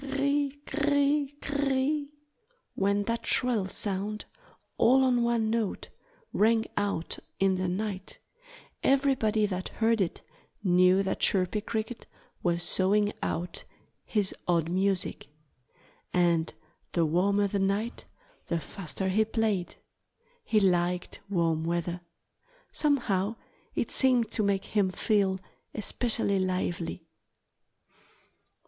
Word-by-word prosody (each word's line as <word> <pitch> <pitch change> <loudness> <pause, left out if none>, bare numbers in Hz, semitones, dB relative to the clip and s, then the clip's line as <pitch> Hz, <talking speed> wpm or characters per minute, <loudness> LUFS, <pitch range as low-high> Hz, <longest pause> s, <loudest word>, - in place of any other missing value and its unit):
Cr 280 - -8
r - - -5
r 275 - -1
i! 285 0 +2 0.2
cr - - -7
r 295 0 +2
r 285 - +3
i! 285 0 +3
cr 285 0 -2
r - - +1
r 270 - +2
i! 285 +3 +1 0.7
When 200 +1 +1
that 230 +2 -3
shrill 235 -7 +1
sound, 205 +2 -3 0.5
all 265 +3 +5
on 250 -2 +3
one 235 -2 +1
note, 225 -3 -2 0.4
rang 225 +1 +3
out 200 -5 -2 0.2
in 190 -1 +3
the 185 0 -1
night 195 +1 -3 0.6
everybody 260 -6 +3
that 185 -2 -3
heard 225 -1 +1
it 175 - -2 0.4
knew 185 +1 +5
that 190 - -2
Chirpy 195 +2 +2
Cricket 220 +2 -4 0.3
was 175 -1 +1
sawing 205 +2 +2
out 175 +1 -3 0.4
his 205 -3 0
odd 170 -2 +1
music. 190 -2 0 0.8
And 170 -2 +2 0.4
the 170 -2 +3
warmer 200 +6 +2
the 200 0 -1
night 200 +5 -1 0.4
the 170 - 0
faster 190 +2 -4
he 215 +4 +3
played. 215 -5 -1 0.7
He 220 - +2
liked 180 -2 +1
warm 165 -4 +1
weather. 170 +1 -2 0.7
Somehow 230 -8 +1 0.4
it - - -1
seemed 250 -4 +3
to - - 0
make 200 -2 +1
him 205 -3 +1
feel 190 0 +1 0.4
especially 215 -2 +1
lively. 180 -3 -2
200 Hz, 130 wpm, -29 LUFS, 185-230 Hz, 0.8 s, all